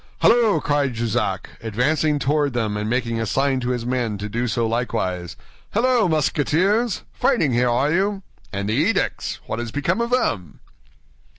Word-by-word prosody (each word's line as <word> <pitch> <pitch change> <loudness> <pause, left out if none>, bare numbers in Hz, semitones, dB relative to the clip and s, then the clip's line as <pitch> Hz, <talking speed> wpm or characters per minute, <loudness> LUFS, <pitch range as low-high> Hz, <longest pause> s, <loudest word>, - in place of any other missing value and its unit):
"Halloo!" 230 -3 +4
cried 145 -4 0
Jussac, 110 -4 -1
advancing 145 +8 +1
toward 145 0 +1
them 110 -4 -1
and 105 +1 -2
making 115 -2 -1
a 115 - -2
sign 135 +3 +1
to 125 0 -3
his 120 -2 -2
men 120 -4 -1
to 105 +1 -5
do 120 +4 -2
so 115 +1 0
likewise, 90 -7 -2 0.4
"halloo, 240 -2 +3
Musketeers? 180 - +1
Fighting 140 -6 +2
here, 120 +1 +2
are 130 +5 +2
you? 195 +2 0 0.3
And 100 0 -3
the 110 - 0
edicts? 175 - 0
What 110 - -4
is 120 -1 -4
become 170 - 0
of 235 - -1
them?" 115 - -1
125 Hz, 165 wpm, -22 LUFS, 115-155 Hz, 0.4 s, Halloo